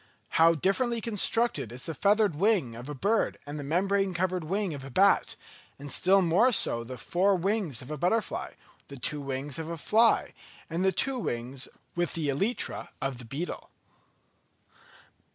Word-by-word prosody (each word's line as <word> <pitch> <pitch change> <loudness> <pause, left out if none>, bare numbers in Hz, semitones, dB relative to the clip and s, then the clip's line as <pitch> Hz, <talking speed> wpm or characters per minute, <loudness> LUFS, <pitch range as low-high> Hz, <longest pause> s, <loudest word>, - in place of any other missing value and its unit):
How 165 +1 +5
differently 230 - 0
constructed 225 - +1
is 125 +1 -5
the 165 - -4
feathered 205 +4 +2
wing 170 - +1
of 120 +4 -9
a 150 - -5
bird 210 - 0
and 145 +1 -6
the - - -5
membrane 190 +5 0
covered 185 0 -1
wing 190 +2 -2
of 140 -2 -7
a 135 - -8
bat; 195 +9 +3 0.4
and 145 0 -8
still 195 +1 +4
more 190 +10 +4
so 115 - +4
the 125 +2 -8
four 190 +7 +1
wings 185 - -1
of 130 - -10
a 150 - -3
butterfly, 210 +6 -1 0.3
the 140 - -10
two 145 +4 -3
wings 135 +1 -3
of 160 0 -5
a 170 - -4
fly, 225 +8 +3 0.4
and 170 +3 -1
the 190 - +3
two 260 +7 0
wings 125 - -3 0.3
with 175 -2 -1
the 155 -3 -1
elytra 200 - -2
of 135 -3 -3
a - - -11
beetle. 145 +9 -5
170 Hz, 170 wpm, -28 LUFS, 140-200 Hz, 0.4 s, How